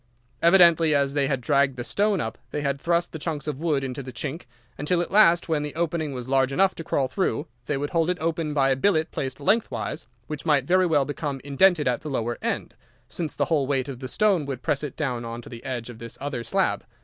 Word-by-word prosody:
Evidently, 170 Hz, -3 st, +6 dB
as 140 Hz, -1 st, +1 dB
they 140 Hz, -2 st, +1 dB
had 135 Hz, -2 st, 0 dB
dragged 135 Hz, +2 st, +2 dB
the 120 Hz, -, -3 dB
stone 205 Hz, -, +1 dB
up 110 Hz, -4 st, -4 dB
they 150 Hz, -, -3 dB
had 140 Hz, -1 st, -1 dB
thrust 170 Hz, +1 st, +1 dB
the 160 Hz, -, -7 dB
chunks 150 Hz, -2 st, -3 dB
of 150 Hz, -3 st, -4 dB
wood 150 Hz, -4 st, 0 dB
into 130 Hz, 0 st, -4 dB
the 130 Hz, -1 st, -8 dB
chink, 140 Hz, +7 st, -5 dB, 0.3 s
until 160 Hz, +5 st, 0 dB
at 175 Hz, -, -2 dB
last, 175 Hz, -5 st, +5 dB
when 160 Hz, -3 st, +1 dB
the 150 Hz, 0 st, -5 dB
opening 160 Hz, -2 st, -1 dB
was 125 Hz, -2 st, -6 dB
large 135 Hz, 0 st, +2 dB
enough 190 Hz, +6 st, +3 dB
to 165 Hz, -, -7 dB
crawl 140 Hz, -3 st, 0 dB
through, 170 Hz, 0 st, -1 dB, 0.2 s
they 145 Hz, -, 0 dB
would 145 Hz, +1 st, -3 dB
hold 165 Hz, 0 st, +1 dB
it 180 Hz, -, 0 dB
open 160 Hz, -1 st, -1 dB
by 135 Hz, -2 st, +2 dB
a -, -, +3 dB
billet 160 Hz, +2 st, +1 dB
placed 130 Hz, 0 st, -4 dB
lengthwise, 200 Hz, -, -1 dB, 0.2 s
which 150 Hz, +3 st, -6 dB
might 145 Hz, -5 st, +2 dB
very 185 Hz, +3 st, +3 dB
well 145 Hz, -4 st, +3 dB
become 145 Hz, -1 st, -4 dB
indented 150 Hz, +3 st, +3 dB
at 125 Hz, -, 0 dB
the 155 Hz, -, -6 dB
lower 120 Hz, -3 st, -2 dB
end, -, -, -2 dB, 0.3 s
since 160 Hz, -4 st, -4 dB
the -, -, +1 dB
whole 145 Hz, -5 st, +1 dB
weight 135 Hz, -1 st, 0 dB
of 135 Hz, -3 st, -6 dB
the 130 Hz, -, -5 dB
stone 185 Hz, -1 st, +2 dB
would 130 Hz, -3 st, -5 dB
press 140 Hz, +2 st, 0 dB
it 145 Hz, -, -5 dB
down 125 Hz, -6 st, -2 dB
on 115 Hz, 0 st, -6 dB
to -, -, -11 dB
the 120 Hz, -1 st, -10 dB
edge 125 Hz, -3 st, -4 dB
of 120 Hz, -2 st, -10 dB
this 115 Hz, -1 st, -8 dB
other 140 Hz, -4 st, -4 dB
slab. 195 Hz, +8 st, 0 dB
145 Hz, 245 wpm, -25 LUFS, 135-165 Hz, 0.3 s, Evidently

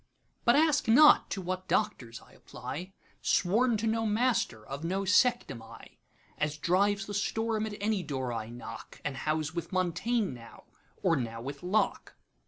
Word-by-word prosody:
But 240 Hz, -, +5 dB
ask 305 Hz, 0 st, +3 dB
not 295 Hz, +7 st, +7 dB
to 190 Hz, -, -4 dB
what 185 Hz, +1 st, -4 dB
Doctors 115 Hz, -2 st, -1 dB
I -, -, -20 dB
apply; 180 Hz, +7 st, -8 dB, 0.3 s
Sworn 225 Hz, +6 st, +2 dB
to 215 Hz, -, -3 dB
no 225 Hz, 0 st, +1 dB
master, 215 Hz, -, 0 dB
of 140 Hz, +4 st, -7 dB
no 190 Hz, +4 st, -1 dB
sect 220 Hz, +5 st, +3 dB
am 115 Hz, -, -8 dB
I:As 150 Hz, +5 st, -8 dB
drives 195 Hz, +5 st, +1 dB
the 205 Hz, -, -7 dB
storm, 220 Hz, +1 st, -1 dB
at 210 Hz, -, -6 dB
any 210 Hz, -1 st, 0 dB
door 130 Hz, -6 st, -3 dB
I 110 Hz, -1 st, -4 dB
knock, 120 Hz, -1 st, -9 dB
And 140 Hz, -, -2 dB
house 155 Hz, +3 st, -2 dB
with 170 Hz, -1 st, -5 dB
Montaigne 185 Hz, +4 st, 0 dB
now, 115 Hz, -2 st, -13 dB, 0.4 s
or 170 Hz, -3 st, +4 dB
now 115 Hz, -4 st, -3 dB
with 140 Hz, +4 st, -7 dB
Locke. 190 Hz, +5 st, -1 dB
185 Hz, 165 wpm, -30 LUFS, 140-220 Hz, 0.4 s, not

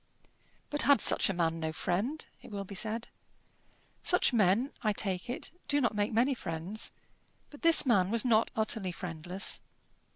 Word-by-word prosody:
But 295 Hz, -, +1 dB
had 285 Hz, -4 st, +5 dB
such -, -, +2 dB
a -, -, 0 dB
man 165 Hz, -2 st, 0 dB
no 160 Hz, -1 st, -2 dB
friend? 210 Hz, -, -2 dB, 0.2 s
it -, -, -13 dB
will 200 Hz, -2 st, -5 dB
be 200 Hz, -, -10 dB
said. 220 Hz, +4 st, -3 dB, 0.9 s
Such 360 Hz, -7 st, +2 dB
men, 220 Hz, +4 st, +3 dB
I 215 Hz, -3 st, +1 dB
take 195 Hz, -1 st, -2 dB
it, 245 Hz, -, -4 dB, 0.2 s
do 290 Hz, -, +2 dB
not 240 Hz, -4 st, +1 dB
make 205 Hz, 0 st, -1 dB
many 240 Hz, +5 st, +2 dB
friends. 175 Hz, -1 st, -4 dB, 0.6 s
But 290 Hz, -, -13 dB
this 330 Hz, -2 st, +7 dB
man 195 Hz, -7 st, +3 dB
was 230 Hz, +2 st, +2 dB
not 225 Hz, -2 st, +3 dB
utterly 215 Hz, -3 st, 0 dB
friendless. 180 Hz, +2 st, -3 dB
215 Hz, 165 wpm, -31 LUFS, 185-240 Hz, 0.9 s, this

